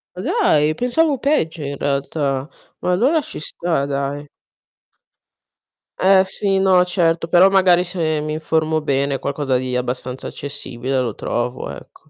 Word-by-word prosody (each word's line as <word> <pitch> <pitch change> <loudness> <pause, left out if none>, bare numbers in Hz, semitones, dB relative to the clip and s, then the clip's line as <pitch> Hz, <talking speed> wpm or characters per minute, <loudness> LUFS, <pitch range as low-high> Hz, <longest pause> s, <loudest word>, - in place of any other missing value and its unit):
Ma - - -6
dai, 155 - +2
pensavo 275 - +1
peggio 170 - 0
in 140 0 -4
realtà. 140 0 -2 0.3
Ma 180 - -1
allora 255 - +3
ci - - -8
sta, 160 -1 -2
dai. 140 +1 -3 1.7
Eh 190 0 +5
sì, 195 0 0
no, 190 -2 +4
certo, 170 -2 +1
però 180 +3 +6
magari 185 -2 +4
se 165 -4 -1
mi 150 0 -3
informo 155 0 0
bene 140 -2 0
qualcosa 140 -2 -1
di 125 0 -3
abbastanza 125 +1 -4
accessibile 135 -2 -4
lo 120 -4 -1
trovo, 120 - -3
ecco. 70 - -12
155 Hz, 140 wpm, -20 LUFS, 140-180 Hz, 1.7 s, però